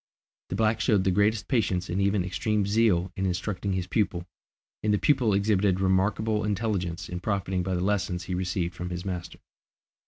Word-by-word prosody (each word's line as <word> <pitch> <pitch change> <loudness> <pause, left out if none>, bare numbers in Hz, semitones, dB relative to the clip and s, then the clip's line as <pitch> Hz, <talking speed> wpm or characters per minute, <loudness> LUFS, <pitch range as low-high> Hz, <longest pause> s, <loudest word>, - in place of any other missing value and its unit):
The - - -2
black 110 +1 +1
showed 105 -6 +3
the 95 - +2
greatest 105 +3 +2
patience 95 -8 0
and 90 +3 -1
even 100 -1 +2
extreme 105 +3 0
zeal 100 -4 +2
in 95 0 -1
instructing 95 +2 -2
his 95 -1 -1
pupil, 90 -2 -1 0.6
and 105 - +1
the 105 - +3
pupil 125 -2 +2
exhibited 100 -2 +2
remarkable 100 +3 +1
intelligence 100 -4 -2
in 90 - -5
profiting 95 -1 -1
by 95 +1 -1
the 90 - -1
lessons 95 -2 0
he 90 - -4
received 90 -1 -1
from 90 +1 -5
his 90 +1 -5
master. 90 -2 -5
95 Hz, 180 wpm, -27 LUFS, 90-105 Hz, 0.6 s, showed